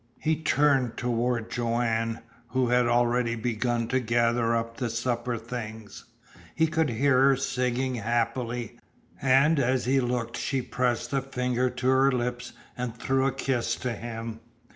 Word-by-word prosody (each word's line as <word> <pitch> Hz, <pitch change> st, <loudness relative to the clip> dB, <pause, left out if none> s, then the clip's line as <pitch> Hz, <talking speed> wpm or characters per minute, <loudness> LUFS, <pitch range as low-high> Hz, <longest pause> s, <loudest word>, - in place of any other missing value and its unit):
He 160 Hz, 0 st, +1 dB
turned 140 Hz, -6 st, +2 dB
toward 120 Hz, -1 st, -1 dB
Joanne, 115 Hz, -1 st, -1 dB, 0.3 s
who 125 Hz, 0 st, 0 dB
had 125 Hz, 0 st, +3 dB
already 120 Hz, 0 st, +2 dB
begun 120 Hz, 0 st, -1 dB
to 130 Hz, -, +2 dB
gather 115 Hz, 0 st, +1 dB
up 115 Hz, 0 st, -3 dB
the 125 Hz, -3 st, -2 dB
supper 120 Hz, +1 st, -2 dB
things. 110 Hz, -2 st, -7 dB, 0.5 s
He 160 Hz, -, +3 dB
could 160 Hz, -1 st, +1 dB
hear 130 Hz, +2 st, +3 dB
her 135 Hz, 0 st, +5 dB
singing 130 Hz, -1 st, -1 dB
happily, 120 Hz, +1 st, -2 dB, 0.4 s
and 135 Hz, +4 st, +4 dB
as 130 Hz, 0 st, +1 dB
he 135 Hz, +2 st, +3 dB
looked 120 Hz, -2 st, -2 dB
she 135 Hz, -1 st, -1 dB
pressed 125 Hz, +1 st, -1 dB
a 135 Hz, -, +2 dB
finger 125 Hz, -1 st, -1 dB
to 125 Hz, -, -3 dB
her 130 Hz, +1 st, +4 dB
lips 125 Hz, -1 st, -2 dB, 0.2 s
and 125 Hz, -2 st, -4 dB
threw 135 Hz, +2 st, +1 dB
a -, -, +1 dB
kiss 130 Hz, -3 st, -1 dB
to 125 Hz, -1 st, -3 dB
him. 115 Hz, -1 st, -6 dB
125 Hz, 150 wpm, -27 LUFS, 115-130 Hz, 0.5 s, her